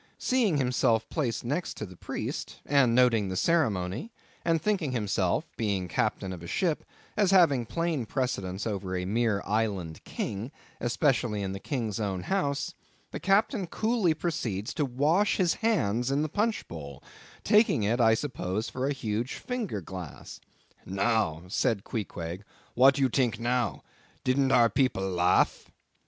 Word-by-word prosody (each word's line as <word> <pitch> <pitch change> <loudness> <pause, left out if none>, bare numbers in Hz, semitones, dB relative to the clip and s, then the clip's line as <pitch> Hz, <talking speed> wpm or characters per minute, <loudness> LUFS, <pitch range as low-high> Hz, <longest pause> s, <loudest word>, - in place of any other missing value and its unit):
Seeing 230 - +2
himself 120 -4 +2
placed 120 -8 -2
next 150 +8 -2
the 95 -4 -7
Priest, - - -5
and 130 -5 +4
noting 115 -5 +4
the 95 - -3
ceremony, 110 - 0 0.3
and 165 -1 +2
thinking 180 -8 0
himself—being 105 -3 -1
Captain 95 +3 -1
of 90 - -8
a 85 - -8
ship—as 185 - -1
having 160 - +4
plain 165 -7 -1
precedence 100 -8 -2
over 100 -4 -3
a 90 - -2
mere 110 0 +1
island 100 -7 -1
King, 105 +6 -4 0.3
especially 120 -4 +1
in 95 - -2
the 95 - -5
King's 115 -5 -3
own 95 -4 -2
house—the 145 -8 -3
Captain 200 0 +2
coolly 215 -4 +1
proceeds 115 - -2
to 150 - 0
wash 150 +10 +2
his 180 -3 +3
hands 125 - +1
in 140 +2 +1
the 155 - -2
punchbowl;—taking 205 - 0
it 115 +4 +1
I 110 -1 +6
suppose 110 -5 -3
for 130 +1 -2
a 145 - +1
huge 115 -1 -2
finger 230 - -3
glass. 90 -3 -8 0.4
"Now," 95 -4 0
said 105 +2 0
Queequeg, 90 -4 -5 0.3
"what 135 +3 +6
you 135 -1 +3
tink 125 -2 +1
now?—Didn't 125 +2 -1
our 120 -2 +6
people 115 -7 +1
laugh?" 90 -1 +2
120 Hz, 135 wpm, -28 LUFS, 100-150 Hz, 0.4 s, I